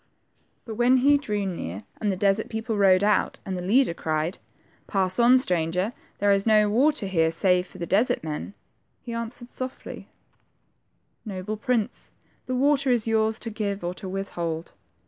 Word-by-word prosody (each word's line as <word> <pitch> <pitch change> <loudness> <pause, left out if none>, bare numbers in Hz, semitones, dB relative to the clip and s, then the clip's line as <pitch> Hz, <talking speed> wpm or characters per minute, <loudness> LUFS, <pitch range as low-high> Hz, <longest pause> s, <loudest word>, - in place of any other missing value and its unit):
But 220 -2 -7
when 245 +2 +4
he 285 +3 +4
drew 210 -8 -2
near, 105 - -5
and 210 -2 0
the - - -1
desert 200 +3 +1
people 225 0 -3
rode 195 -2 +4
out, 210 0 +2
and 190 - -3
the 180 - -4
leader 215 +3 +3
cried, 160 +1 -2 0.5
Pass 190 0 +1
on, 240 +2 +6
stranger, 180 -1 0 0.2
there 205 0 +2
is 195 +2 +1
no 210 -1 +4
water 270 +1 +2
here 165 -4 +2
save 180 +2 +2
for - - -14
the 170 - -4
desert 205 +3 +1
men," 155 +5 -5 0.5
he 235 - -6
an 230 0 -2
swered 240 +1 -9
softly, 255 +1 -5 0.6
— - - -46
Noble 190 +3 -4
prince, 230 +1 -2 0.3
the 255 - -1
water 275 +1 +2
is 240 -3 +2
yours' 220 -1 +1
to 230 - -3
give 205 -3 -3
or 175 +1 -2
to 185 +1 -8
withhold. 170 -4 -4
205 Hz, 175 wpm, -25 LUFS, 185-235 Hz, 0.6 s, on